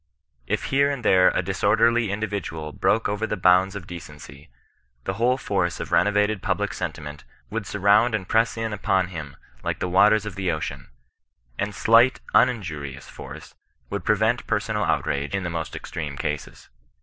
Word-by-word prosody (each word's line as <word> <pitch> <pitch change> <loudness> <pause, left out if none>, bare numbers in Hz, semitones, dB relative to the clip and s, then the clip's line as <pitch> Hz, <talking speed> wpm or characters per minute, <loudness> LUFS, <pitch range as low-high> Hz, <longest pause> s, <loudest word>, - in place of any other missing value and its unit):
If - - -1
here 140 +1 +4
and 140 -4 -4
there 90 0 +6
a 95 - -1
disorderly 110 +5 +2
individual 100 -7 -4
broke 110 +9 +1
over 105 +2 -2
the 105 - -2
boimds 95 +1 +4
of 95 -4 -6
decency, 75 -6 -11 0.5
the 95 - -2
whole 120 +5 +2
force 95 -8 -1
of - - -6
renovated 105 0 +2
public - - -1
sentiment 75 -1 -6 0.3
would 110 -3 -3
surround 105 +4 +3
and 95 -4 -4
press 115 +1 +2
in 115 -1 -2
upon 95 -3 0
him 75 -5 -7 0.3
like - - -2
the - - -2
waters 105 +4 +4
of 105 - -5
the 95 -2 -1
ocean, 80 -1 -5 0.7
and 105 0 -2
slight 115 +3 +5
uninjurious 80 - 0
force - - -10 0.4
would - - -3
prevent - - +1
personal - - 0
outrage 70 +6 -1
in 95 - -2
the 85 - -3
most 80 -1 -4
extreme - - -6
cases. 75 0 -5
100 Hz, 160 wpm, -24 LUFS, 85-110 Hz, 0.7 s, there